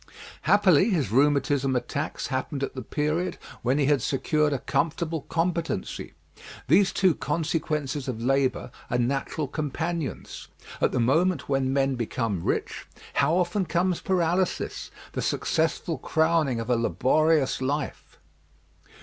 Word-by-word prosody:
Happily 195 -1 +5
his 155 - 0
rheumatism 135 0 +2
attacks 125 - -3
happened 135 +2 -2
at - - -3
the 130 - -5
period 155 +8 -1 0.2
when 130 +3 +1
he 145 - +2
had 145 -2 +3
secured 150 +3 +1
a 140 - +1
comfortable 160 +4 -1
competency. 165 - -2 0.5
These 185 +7 +5
two 185 -3 +3
consequences 150 -3 -2
of 125 -4 -3
labour 130 0 0 0.2
are 120 - +1
natural 135 +4 -1
companions. 160 +2 -4 0.3
At - - +3
the - - 0
moment 160 +8 +2
when 135 -1 +1
men 135 0 +2
become 115 -5 -2
rich, - - -2 0.3
how 145 +5 +2
often 180 +2 +1
comes 175 +1 0
paralysis 180 0 0 0.2
the - - -3
sorrowful 160 -1 0
crowning 160 -5 +1
of 115 +2 -3
a - - +4
laborious 140 +5 +2
life! 145 +3 -3
150 Hz, 130 wpm, -26 LUFS, 130-165 Hz, 0.5 s, Happily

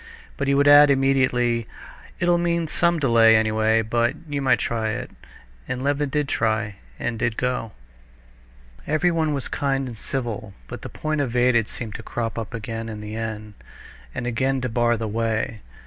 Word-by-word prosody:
But 140 - -2
he 140 - +3
would 140 +1 +4
add 145 0 +9
immediately, 130 -4 +2 0.5
"It'll 175 0 +3
mean 170 -1 0
some 170 +2 +1
delay, 115 -6 +5
anyway, 110 +1 +2
but 120 +2 +1
you 145 -1 -2
might 135 - +3
try 110 -2 -1
it." - - -5 0.6
And 125 0 -3
Levin 145 0 0
did 150 0 0
try, 110 -4 -1 0.2
and 115 -2 -3
did 115 -1 -1
go. 125 -4 -2 1.1
Everyone 160 0 +1
was 140 -3 -2
kind 135 -1 -1
and 120 - -7
civil, 110 -4 -4
but - - -8
the - - -7
point 155 -1 -2
evaded 120 -3 +2
seemed 110 -3 -6
to - - -7
crop 115 0 -3
up 115 +1 -6
again 115 0 -5
in 110 -1 -6
the 105 +1 -7
end, 110 -1 -5 0.6
and 125 - -3
again 130 +3 0
to 125 - -2
bar 120 0 +2
the 110 0 -3
way. 110 0 -2
120 Hz, 170 wpm, -23 LUFS, 110-140 Hz, 1.1 s, add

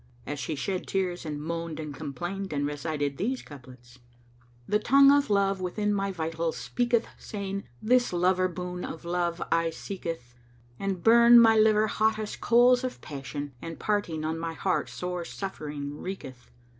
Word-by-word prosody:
And 145 0 -4
she 155 - -3
shed 185 +6 -3
tears 180 -3 -2
and 150 -1 -4
moaned 165 +1 -4
and 150 -2 -5
complained 175 +7 -5
and 145 0 0
recited 145 -1 -2
these 250 +5 -2
couplets, 125 -3 -14 0.7
"The 210 - +2
tongue 275 +4 +6
of 285 -2 +3
Love 195 -2 +2
within 205 +3 -1
my 195 -1 0
vitals 165 -1 -2
speaketh 240 -1 0
* - - -27
Saying, 200 -1 -5 0.2
'This 245 +2 +3
lover 185 +1 +2
boon 180 0 -5
of 165 +1 -7
Love 175 0 -1
aye 165 0 +3
seeketh!' 165 -7 -6 0.5
And 195 -3 -2
burn 235 +1 +8
my 225 -1 +7
liver 215 0 +5
hottest 215 0 -1
coals 245 +2 +5
of 255 - -4
passion 145 0 -6
* - - -28
And 165 -1 -6
parting 175 -7 -1
on 160 +1 -2
my 165 0 -3
heart 185 +2 -1
sore 180 -1 -4
suffering 150 -7 -5
wreaketh. 135 -10 -7
180 Hz, 165 wpm, -28 LUFS, 155-210 Hz, 0.7 s, burn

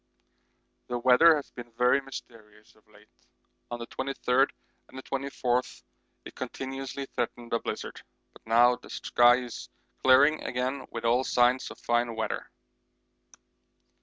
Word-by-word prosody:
The 125 - -2
weather 130 +7 +6
has 145 - -6
been 120 -1 -10
very 125 +3 +3
mysterious 110 -5 -12
of - - -29
late; - - -21 0.6
on 120 - -4
the 120 - -7
23rd 135 +1 0 0.4
and 130 0 -10
24th 130 -2 -2 0.4
it - - -10
continuously 135 +1 -6
threatened 120 -2 -5
a 115 - +2
blizzard, - - -6 0.3
but - - -18
now 120 +2 +5
the - - -16
sky 120 +1 +3
is 120 -2 -8 0.3
clearing 140 +4 +5
again 130 +2 -3
with 115 0 -6
all 120 +3 +3
signs 125 0 +2
of - - -11
fine 120 -1 0
weather. 110 - -3
125 Hz, 135 wpm, -28 LUFS, 120-135 Hz, 0.6 s, weather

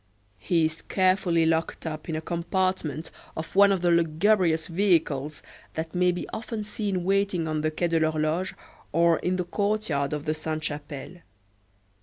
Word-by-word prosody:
He 160 - +2
is 160 +1 -3
carefully 185 -3 +2
locked 160 +1 0
up 155 +1 -5
in 160 - -1
a 155 - -2
compartment 170 -2 -1 0.3
of 160 +3 -6
one 200 0 +7
of 190 -3 0
the 175 - +4
lugubrious 170 0 +3
vehicles 160 -6 +1 0.3
that 160 0 -4
may 180 0 +3
be 175 - -4
often 220 -1 -4
seen 205 -3 -2
waiting 195 -3 +1
on 155 -1 -1
the 155 - +1
Quai 170 +2 -1
de 165 -1 +2
l'Horloge, 155 +3 0 0.4
or 170 0 +4
in 180 +1 0
the 180 -1 -1
courtyard 200 -7 0
of 150 -1 -3
the 155 - +1
Sainte 155 0 -3
Chapelle. 145 +2 -5
165 Hz, 165 wpm, -26 LUFS, 155-185 Hz, 0.4 s, one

